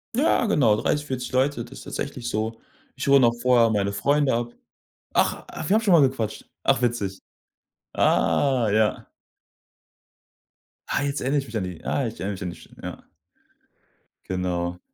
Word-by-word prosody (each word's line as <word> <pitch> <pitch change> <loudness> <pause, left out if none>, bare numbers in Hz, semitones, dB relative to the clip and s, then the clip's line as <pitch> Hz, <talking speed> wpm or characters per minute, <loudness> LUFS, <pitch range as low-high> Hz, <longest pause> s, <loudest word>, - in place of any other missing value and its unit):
Ja, 265 -3 +3
genau, 120 - +3
30, 145 0 0
40 130 -3 -4
Leute, 130 -2 +1
das 135 +3 -11
ist - - -11
tatsächlich 130 -4 -5
so. 110 +2 -2 0.4
Ich 130 - -4
hole 140 0 +7
noch 120 -2 +4
vorher 120 -2 +5
meine 100 -2 0
Freunde 140 +7 +2
ab. 120 0 -2 0.6
Ach - - +1
ach, 160 - -6
wir 195 - +4
haben 220 - +3
schon 200 -5 +3
mal 165 - +7
gequatscht. 130 -5 0 0.2
Ach, 125 - +3
witzig. 105 -6 -1 0.7
Ah, 130 -6 +2
ja. 110 0 +1 1.8
Ah, - - 0
jetzt 140 0 -1
erinner 135 +3 0
ich 140 - -1
mich 110 0 -5
an 95 - -2
die. 90 -3 -8
Ah, 135 -4 0
ich 110 - -8
erinner 95 +4 -2
mich 95 - -7
an 90 - -3
die - - -10
St - - -16
ja. - - -7 1.3
Genau. 90 -1 -2
120 Hz, 175 wpm, -24 LUFS, 105-140 Hz, 1.8 s, hole